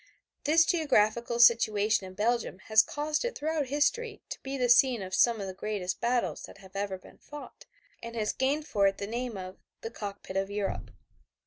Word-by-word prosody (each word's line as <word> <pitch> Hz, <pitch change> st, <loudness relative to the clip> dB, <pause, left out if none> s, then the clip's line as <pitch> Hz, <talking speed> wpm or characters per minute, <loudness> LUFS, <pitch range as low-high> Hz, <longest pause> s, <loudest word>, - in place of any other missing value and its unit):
This 325 Hz, +3 st, +5 dB
geographical 235 Hz, -8 st, +1 dB
situation 215 Hz, -4 st, +4 dB
of 185 Hz, -, -12 dB
Belgium 230 Hz, -2 st, 0 dB
has 220 Hz, 0 st, +8 dB
caused 300 Hz, +1 st, -2 dB
it 485 Hz, +1 st, -3 dB
throughout 305 Hz, -2 st, -1 dB
history 420 Hz, -, -1 dB
to -, -, -6 dB
be 270 Hz, +1 st, -5 dB
the 250 Hz, -1 st, +1 dB
scene 240 Hz, -2 st, +4 dB
of 185 Hz, 0 st, -8 dB
some 230 Hz, +3 st, +3 dB
of 200 Hz, -, -4 dB
the 190 Hz, -, -6 dB
greatest 190 Hz, -1 st, -4 dB
battles 240 Hz, 0 st, 0 dB
that -, -, -14 dB
have 190 Hz, -1 st, -16 dB
ever 200 Hz, -1 st, -2 dB
been 185 Hz, -, -18 dB
fought, 295 Hz, 0 st, -11 dB, 0.4 s
and 230 Hz, 0 st, -8 dB
has 215 Hz, -2 st, -1 dB
gained 285 Hz, +3 st, 0 dB
for 200 Hz, -8 st, +2 dB
it 195 Hz, -, -1 dB
the 200 Hz, -, -4 dB
name 235 Hz, +1 st, -4 dB
of 185 Hz, 0 st, -8 dB, 0.2 s
"the 225 Hz, -, -6 dB
cockpit 200 Hz, -3 st, -7 dB
of 195 Hz, 0 st, -1 dB
Europe." 200 Hz, -1 st, -3 dB
230 Hz, 195 wpm, -29 LUFS, 200-275 Hz, 0.4 s, has